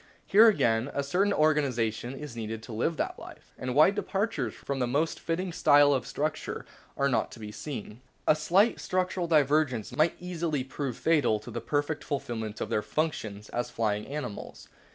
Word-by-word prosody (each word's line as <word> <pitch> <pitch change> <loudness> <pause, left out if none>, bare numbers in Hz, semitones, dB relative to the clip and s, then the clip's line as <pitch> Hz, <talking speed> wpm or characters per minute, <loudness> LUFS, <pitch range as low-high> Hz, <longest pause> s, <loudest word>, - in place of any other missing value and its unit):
Here 220 +4 +7
again 115 - +2
a 140 - 0
certain 185 +8 +1
organisation 130 - +1
is 145 -3 -8
needful 110 -1 -4
to 115 - -9
live 155 +9 -1
that - - -2
life, - - -13
and 125 0 -4
wide 155 +7 +6
departures 205 +2 -2
from 140 -1 -4
the 125 - +1
most 150 +6 0
fitting 175 +2 -2
type 145 -3 +5
of 140 -3 +2
structure 155 +2 -3 0.3
are 140 - +2
not 135 - +1
to - - -11
be 105 -1 -7
seen. 105 0 -7 0.2
A - - +5
slight 185 +9 +3
structural 185 -1 -1
divergence 145 -7 +2
might 155 +2 +2
easily 170 -6 -2
prove 130 -1 -4
fatal 150 -9 +2
to - - -9
the - - -4
perfect 145 +1 -1
fulfilment 115 -6 -4
of - - -2
their 105 - +1
functions 110 -9 -3
as 120 0 -2
flying 105 -4 -1
animals. 145 -7 -6
145 Hz, 175 wpm, -28 LUFS, 115-160 Hz, 0.3 s, Here